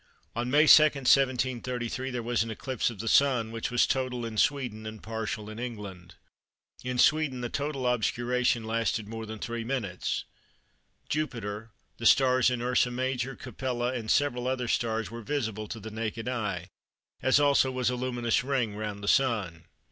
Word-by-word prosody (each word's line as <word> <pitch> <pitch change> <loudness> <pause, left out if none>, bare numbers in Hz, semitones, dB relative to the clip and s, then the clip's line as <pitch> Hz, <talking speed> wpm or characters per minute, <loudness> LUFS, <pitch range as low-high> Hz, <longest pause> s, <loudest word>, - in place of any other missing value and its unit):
On 120 +1 -2
May 150 +4 +5
2, 155 - +10
1733, 130 -3 +1
there 125 -2 -3
was 120 -1 0
an 115 - -2
eclipse 130 +4 -2
of 115 - -8
the 115 - -5
Sun, 125 -4 +3
which 115 -1 -3
was 120 0 +3
total 125 -2 -1
in 115 -1 -5
Sweden 120 -4 0
and 110 0 -8
partial 110 -1 -4
in 110 +1 -8
England. 100 -8 -7 0.7
In 125 0 -3
Sweden 145 -2 +3
the 120 - -3
total 140 -1 -3
obscuration 120 0 +1
lasted 110 -1 -1
more 110 0 -6
than 110 +1 -6
3 115 +2 -4
minutes. 115 -8 -2 0.8
Jupiter, 115 -8 -3 0.3
the 115 - +1
stars 130 -2 +5
in 125 -1 -2
Ursa 125 0 +2
Major, 130 +1 -2
Capella, 125 0 -3
and 115 -4 -4
several 125 -3 +1
other 130 -1 -1
stars 115 -1 -1
were 115 0 -7
visible 110 -4 -3
to 115 - -6
the 110 +1 -8
naked 115 +1 -4
eye, 100 -7 -3 0.5
as 130 +2 +4
also 140 -2 +4
was 125 -1 0
a - - -1
luminous 120 -2 0
ring 125 -6 -1
round 105 -1 -5
the - - -4
Sun. 105 -11 +1
120 Hz, 170 wpm, -28 LUFS, 110-130 Hz, 0.8 s, 2